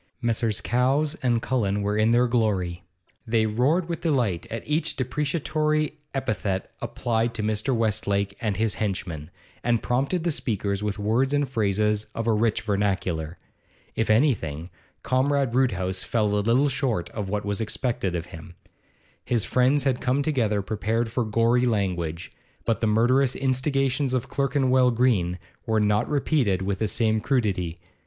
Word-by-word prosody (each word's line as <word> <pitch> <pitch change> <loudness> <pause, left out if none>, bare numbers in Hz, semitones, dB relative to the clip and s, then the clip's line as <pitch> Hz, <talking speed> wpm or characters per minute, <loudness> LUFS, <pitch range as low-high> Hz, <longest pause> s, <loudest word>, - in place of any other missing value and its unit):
Messrs. 115 -2 0
Cowes 135 +5 +1
and 120 -3 +1
Cullen 105 -5 0
were 105 +1 0
in 110 +1 +3
their 120 +1 +4
glory; 100 -8 0 0.5
they 110 -1 +2
roared 135 +11 +1
with 170 -1 -4
delight 120 - 0
at 115 - -6
each 150 +3 0
depreciatory 150 +3 -1 0.2
epithet 100 -7 -2
applied 115 0 -1
to 110 - -2
Mr. 110 +5 0
Westlake 100 -3 0
and 105 -4 -1
his 110 0 +1
henchmen, 90 -7 -3 0.3
and 120 -2 +1
prompted 135 +8 0
the 170 - +1
speakers 100 -7 -1
with 105 -1 -2
words 115 +7 +1
and 145 -1 +1
phrases 105 -3 0
of 115 - -2
a 115 - +3
rich 110 0 +1
vernacular. 95 -6 -1 0.6
If 115 - 0
anything, 95 - +1 0.3
Comrade 135 -1 +1
Roodhouse 95 -8 +1
fell 105 -3 0
a 105 - +2
little 120 +7 +3
short 125 - -1
of 105 -3 -4
what 105 0 -2
was 100 +2 -2
expected 110 -4 -1
of 85 -1 -3
him. 85 +1 -11 0.7
His 120 -4 0
friends 130 +3 +2
had 130 -2 0
come 130 +3 +1
together 115 -9 0
prepared 110 +3 -1
for 125 +1 0
gory 115 +3 +2
language, 90 -6 -2 0.3
but 115 -3 +1
the 115 - +2
murderous 125 +5 +3
instigations 135 0 0
of 125 - -2
Clerkenwell 130 -2 +2
Green 110 -8 +1 0.3
were 110 -1 +2
not 105 0 +1
repeated 135 - +1
with 95 0 -2
the 110 - +1
same 110 0 +1
crudity. 100 - -1
115 Hz, 155 wpm, -25 LUFS, 100-130 Hz, 0.7 s, their